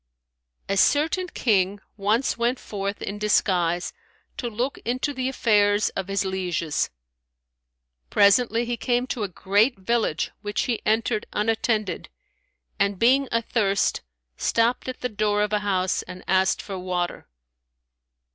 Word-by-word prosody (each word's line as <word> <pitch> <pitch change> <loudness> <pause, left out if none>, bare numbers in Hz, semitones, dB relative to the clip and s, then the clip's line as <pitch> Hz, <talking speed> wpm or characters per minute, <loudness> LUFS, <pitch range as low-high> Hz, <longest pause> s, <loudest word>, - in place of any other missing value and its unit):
A 195 - 0
certain 315 - +2
King 200 - +1 0.2
once 215 +5 +1
went 240 +2 0
forth 200 -1 -4
in 205 +1 -4
disguise, 180 -4 +1 0.4
to 240 - -3
look 240 +5 -3
into 255 +5 -2
the 260 -1 -2
affairs 210 -5 +3
of 190 -1 -5
his 195 0 0
lieges. 180 -5 -1 1.2
Presently, 230 +3 +4
he 240 0 -2
came 245 +1 0
to 250 -2 -4
a 205 - 0
great 205 +6 +2
village 195 -4 0
which 205 0 -2
he 235 -3 -1
entered 220 -1 +1
unattended 215 -1 0 0.7
and 200 -1 +1
being 265 +6 +4
athirst, 220 -4 +1 0.4
stopped 235 +3 +1
at 255 - -7
the 250 - 0
door 210 -2 0
of 210 0 -2
a 210 - +3
house 190 -3 0
and 180 - -10
asked 190 0 +2
for 195 -2 -6
water. 180 -1 -3
210 Hz, 135 wpm, -24 LUFS, 195-235 Hz, 1.2 s, Presently